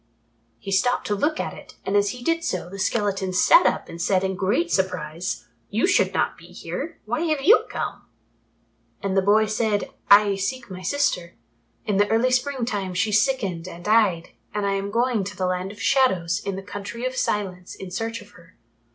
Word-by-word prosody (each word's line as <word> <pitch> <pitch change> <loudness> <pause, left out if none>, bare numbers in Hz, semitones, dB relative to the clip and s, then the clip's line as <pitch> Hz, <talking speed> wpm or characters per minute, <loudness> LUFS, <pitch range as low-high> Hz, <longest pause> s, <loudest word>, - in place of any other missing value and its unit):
He 195 - -7
stopped 220 +6 +2
to 210 - 0
look 305 +9 0
at - - -3
it, - - -13
and 195 - -1
as 205 0 +3
he 245 +3 -7
did 330 +3 0
so, 180 - -3
the 195 - -8
skeleton 195 -2 0
sat - - +6
up - - -1
and 170 - -8
said 185 +1 +2
in 190 0 -1
great 245 - 0
surprise, 180 -2 -2 0.2
"You 215 +3 +1
should 380 - +3
not - - -1
be - - -14
here. - - -6
Why 310 - -2
have 305 -3 0
you 415 +9 +6
come?" - - -5 1.0
And 195 -1 -1
the 195 - +4
boy 210 +3 +4
said, 215 -1 -1 0.2
"I 200 -1 +6
seek 235 +3 -3
my 185 0 -7
sister. 180 -6 -1 0.5
In 205 -2 0
the 205 +1 +3
early 230 +3 +2
spring 255 0 0
time 195 -6 -3
she 205 +4 +1
sickened 205 -7 +1
and 175 -1 -10
died, 210 -6 +3 0.3
and 210 -1 0
I 200 - +1
am 195 0 -2
going 235 -1 +1
to 200 +2 -7
the 185 - 0
Land 185 +1 -2
of 205 - -13
Shadows 200 -6 +2
in 195 - -3
the 195 - -6
Country 205 +4 -6
of 255 0 -2
Silence 190 -7 -2
in 190 -1 -9
search 225 +3 -3
of 205 - -20
her." 180 -3 -19
205 Hz, 205 wpm, -24 LUFS, 190-235 Hz, 1.0 s, sat